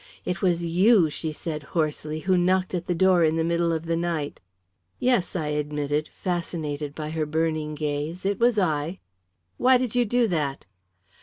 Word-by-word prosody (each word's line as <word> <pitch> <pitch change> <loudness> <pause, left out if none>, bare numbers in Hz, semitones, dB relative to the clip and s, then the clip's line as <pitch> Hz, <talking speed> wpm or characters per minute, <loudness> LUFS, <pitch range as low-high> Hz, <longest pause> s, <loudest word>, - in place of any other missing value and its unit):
"It 180 -1 -2
was 175 -2 +1
you," 180 0 +4
she 160 +1 -3
said 155 0 -5 0.2
hoarsely, 155 0 -1
"who 185 +2 +2
knocked 185 +1 +2
at 175 -1 -3
the 175 - 0
door 185 0 +4
in 160 0 +3
the 165 - +1
middle 170 0 +1
of 165 0 -2
the 165 0 0
night." 165 -3 -2 0.6
"Yes," 245 -9 +1
I 155 -4 -1
admitted, 150 0 -1
fascinated 155 -5 -4
by 155 -1 -5
her 155 -1 -1
burning 155 -1 -1
gaze, 150 +4 -3
"it 200 0 0
was 240 -1 +3
I." 160 -2 0 0.6
"Why 255 0 +5
did 250 -3 -2
you 245 -1 +3
do 240 +2 +2
that?" 145 -5 -2
165 Hz, 175 wpm, -25 LUFS, 150-185 Hz, 0.6 s, Why